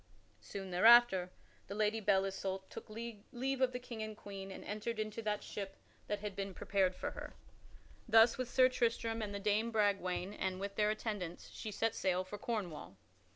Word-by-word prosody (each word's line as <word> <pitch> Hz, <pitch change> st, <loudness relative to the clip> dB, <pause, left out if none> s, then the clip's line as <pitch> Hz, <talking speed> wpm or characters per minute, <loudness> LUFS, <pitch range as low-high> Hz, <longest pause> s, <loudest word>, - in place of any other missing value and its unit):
Soon 195 Hz, -2 st, -7 dB
thereafter 195 Hz, -1 st, +7 dB, 0.4 s
the 200 Hz, -, -5 dB
Lady 215 Hz, +1 st, +1 dB
Belle 195 Hz, -2 st, +3 dB
Isoult 190 Hz, 0 st, -4 dB
took -, -, -9 dB
leave 235 Hz, +4 st, -4 dB
of 255 Hz, -1 st, +4 dB
the 250 Hz, -, -3 dB
King 245 Hz, -3 st, -7 dB
and 215 Hz, 0 st, -4 dB
the -, -, -19 dB
Queen 195 Hz, -1 st, -7 dB
and 190 Hz, -, -8 dB
entered 215 Hz, +2 st, -3 dB
into 215 Hz, +1 st, -3 dB
that 210 Hz, -1 st, -1 dB
ship 195 Hz, -1 st, -6 dB, 0.3 s
that 205 Hz, -1 st, -2 dB
had 210 Hz, -2 st, -4 dB
been 195 Hz, -1 st, -4 dB
prepared 190 Hz, -2 st, +1 dB
for -, -, -3 dB
her. -, -, -8 dB, 0.7 s
Thus, 225 Hz, +1 st, +7 dB
with 255 Hz, -2 st, -3 dB
Sir 255 Hz, +1 st, +6 dB
Tristram 230 Hz, -2 st, 0 dB
and 210 Hz, -2 st, -3 dB
with 200 Hz, -1 st, -5 dB
Dame 215 Hz, +2 st, +2 dB
Bragwaine 200 Hz, -3 st, +1 dB
and 185 Hz, -2 st, -2 dB
with 200 Hz, 0 st, -4 dB
their 210 Hz, 0 st, +3 dB
attendants, 205 Hz, -5 st, -4 dB
she 215 Hz, -, -6 dB
set 225 Hz, +2 st, 0 dB
sail 185 Hz, -1 st, +1 dB
for 200 Hz, +2 st, -8 dB
Cornwall. 190 Hz, -, -4 dB
210 Hz, 190 wpm, -35 LUFS, 195-225 Hz, 0.7 s, thereafter